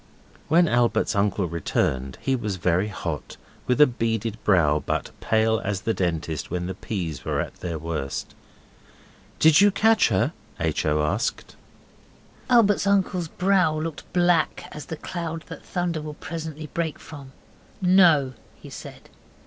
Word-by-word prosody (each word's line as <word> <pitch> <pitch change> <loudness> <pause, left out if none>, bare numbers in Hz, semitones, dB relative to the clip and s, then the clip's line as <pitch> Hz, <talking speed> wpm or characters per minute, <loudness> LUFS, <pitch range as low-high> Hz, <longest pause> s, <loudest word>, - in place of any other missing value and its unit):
When 170 +3 +4
Albert's 120 -5 +2
uncle 100 -1 +1
returned 70 -6 -1
he 135 - 0
was 105 -5 -3
very 90 +2 +1
hot, 85 -7 -5 0.3
with 125 +2 +1
a 150 - +9
beaded 115 -3 -2
brow, 80 -7 +3
but - - -2
pale 110 0 +2
as 100 -1 -2
the 115 +2 0
Dentist 80 -5 -2
when 90 0 -2
the 95 - -3
peas 90 -7 -5
were - - -1
at - - -4
their 85 -2 -4
worst. 75 -3 -4 1.0
'Did 160 +2 +6
you 205 - +7
catch 220 +3 +4
her?' 95 -4 +1 0.3
H. - - -1
O. 75 0 +2
asked. 75 - -2 0.9
Albert's 210 -5 +4
uncle's 190 -3 +1
brow 180 -2 +2
looked 160 -1 -6
black 175 -3 +2
as 150 - -8
the 160 - -5
cloud 165 -2 -5
that - - -9
thunder 175 -3 -2
will 150 0 -7
presently 160 -1 -6
break 165 -2 -2
from. 140 -4 -11 0.5
'No,' 175 -8 +5 0.3
he - - -12
said. - - -10
125 Hz, 150 wpm, -24 LUFS, -, 1.0 s, a